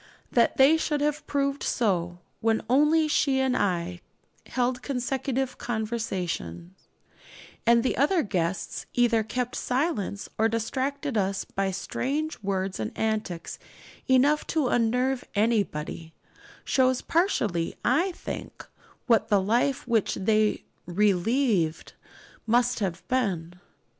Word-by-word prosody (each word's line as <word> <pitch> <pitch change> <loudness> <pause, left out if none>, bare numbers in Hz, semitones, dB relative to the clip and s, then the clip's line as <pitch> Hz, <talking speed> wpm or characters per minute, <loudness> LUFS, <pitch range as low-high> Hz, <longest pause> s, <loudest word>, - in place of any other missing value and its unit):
That 235 - +3
they 275 +4 +6
should 300 -2 -1
have 300 +1 -1
proved 280 0 0
so, 175 -7 0 0.2
when 225 0 +1
only 300 +5 +4
she 275 -3 +2
and 265 -1 +1
I 175 -2 -1 0.5
held 250 0 -1
consecutive 265 0 -2
conversation, 190 - -3 0.9
and 235 0 +5
the 255 - 0
other 315 +5 +2
guests 180 -2 -2
either 240 -2 +3
kept 245 +4 -3
silence 250 - -1
or 225 +1 +4
distracted 265 +4 -2
us 195 0 -1
by 195 0 -2
strange 275 - -3
words 190 -1 -2
and 110 -1 -3
antics 215 -6 -2 0.5
enough 275 +4 +3
to 305 -6 +1
unnerve 250 +3 +1
anybody, 195 -7 -1 0.5
shows 255 -1 +2
partially, 215 - 0
I 370 +3 +3
think, - - -7 0.4
what 230 -3 +3
the 205 - +4
life 240 +7 +1
which 230 -4 +1
they 215 +2 +1 0.2
'relieved' 200 - +1 0.5
must 240 +2 +2
have 185 -4 -3
been. 190 -10 -1
230 Hz, 115 wpm, -26 LUFS, 195-265 Hz, 0.9 s, they